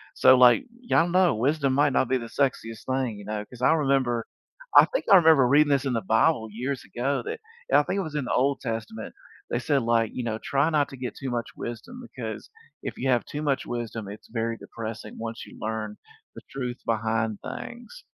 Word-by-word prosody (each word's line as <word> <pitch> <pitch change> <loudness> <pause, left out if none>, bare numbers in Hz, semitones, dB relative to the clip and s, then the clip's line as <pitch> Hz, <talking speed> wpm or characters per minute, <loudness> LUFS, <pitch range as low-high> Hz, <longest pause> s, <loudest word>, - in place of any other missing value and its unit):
So, 130 - +7
like, 125 - +6 0.2
y'all 175 -8 +2
know 180 -7 +3
wisdom 140 +3 +1
might 145 0 +3
not 130 - +2
be 130 - +2
the 115 - -6
sexiest 115 -4 -2
thing, 130 -5 -1
you 100 - -10
know, 105 0 -4
'cause 125 -1 -14
I 125 - +5
remember 135 -6 +1 0.5
I - - +10
think - - -3
I - - +10
remember 160 -6 +6
reading 145 +3 +5
this 140 -1 +2
in 130 - 0
the 115 - 0
Bible 110 +3 +2
years 125 +5 -4
ago 135 +4 -1
that 445 +3 -5 0.3
I - - +6
think 195 - -2
it - - +1
was 155 -5 -6
in 145 -3 -1
the - - -2
Old 135 +2 +2
Testament, 115 -2 -5 0.4
they - - 0
said, 140 0 +1
like, 115 -1 +2
you 125 - -4
know, 110 -2 -2
try 140 +3 +2
not 150 -2 +2
to 135 - -10
get 125 -1 -5
too 135 - -5
much 120 -2 -2
wisdom 180 - -7
because 115 - -7 0.3
if - - -5
you 135 - -2
have 120 -2 +3
too 150 - -5
much 140 -3 0
wisdom, 115 -3 -5
it's 105 - -10
very 115 0 -2
depressing 110 -1 -8
once 115 0 -6
you - - -14
learn 110 -1 -3 0.4
the - - -9
truth 125 -2 -4
behind 110 -1 -1
things, 365 - -8
125 Hz, 215 wpm, -26 LUFS, 115-145 Hz, 0.5 s, I